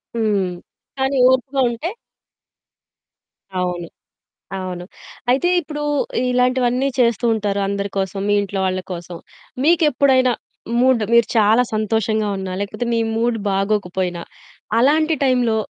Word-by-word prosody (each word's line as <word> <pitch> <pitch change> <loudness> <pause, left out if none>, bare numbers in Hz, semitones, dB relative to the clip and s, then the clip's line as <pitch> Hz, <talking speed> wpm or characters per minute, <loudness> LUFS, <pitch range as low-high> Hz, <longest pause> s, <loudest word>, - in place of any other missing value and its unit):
హ్మ్. 210 -4 +1 0.5
కానీ 265 +1 0
ఓర్పుగా 265 +1 0
ఉంటే 235 +9 -4 1.7
అవును. 180 -1 -2 0.7
అవును. 180 -1 -5 0.5
అయితే 275 +8 +2
ఇప్పుడు 300 -2 -6 0.5
ఇలాంటివన్నీ 250 +1 +2
చేస్తూ 235 -2 +2
ఉంటారు 205 -2 -1
అందరి 200 0 -2
కోసం 190 0 -2
మీ 205 - +3
ఇంట్లో 200 -1 -3
వాళ్ళ 185 0 -1
కోసం. 175 0 -7 0.5
మీకెప్పుడైనా 280 -5 +4 0.5
మూడ్, 255 -2 +4
మీరు 235 -1 +5
చాలా 220 +3 +5
సంతోషంగా 215 0 0
ఉన్నా, 190 -1 -5
లేకపోతే 205 +4 -3
మీ - - +1 0.2
మూడ్ 230 +1 +1
బాగోకపోయినా, 190 -3 -1 0.6
అలాంటి 310 +6 +3
టైంలో 250 -4 +2
225 Hz, 110 wpm, -20 LUFS, 195-255 Hz, 1.7 s, మీరు